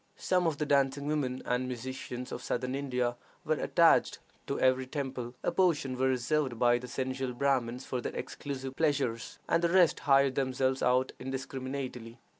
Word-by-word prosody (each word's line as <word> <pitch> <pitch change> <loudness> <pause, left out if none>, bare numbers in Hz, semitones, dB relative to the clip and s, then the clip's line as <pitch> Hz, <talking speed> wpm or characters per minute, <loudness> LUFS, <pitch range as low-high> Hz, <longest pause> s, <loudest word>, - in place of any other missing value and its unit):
Some 180 -2 +1
of 155 -3 -1
the 150 - -1
dancing 140 0 +2
women 145 -4 -1
and 125 +1 0
musicians 125 0 -6
of - - -5
Southern 125 +1 -2
India 125 -3 -1 0.3
were - - +2
attached - - +3 0.3
to - - -2
every 130 0 +3
temple; 130 -3 -4
a - - +1
portion 160 -8 +1
were 130 +1 +1
reserved 130 0 0
by 120 +1 +4
the 125 - -8
sensual 130 0 -3
Brahmins 125 -1 0
for 125 -2 -3
their - - -5
exclusive 135 -2 -5
pleasures, 135 -8 0
and 165 +1 +2
the 170 - +3
rest 180 -2 +4
hired 135 -1 +4
themselves 130 0 0
out 125 +1 +2
indiscriminately. 130 -2 -5
130 Hz, 165 wpm, -30 LUFS, 125-140 Hz, 0.3 s, by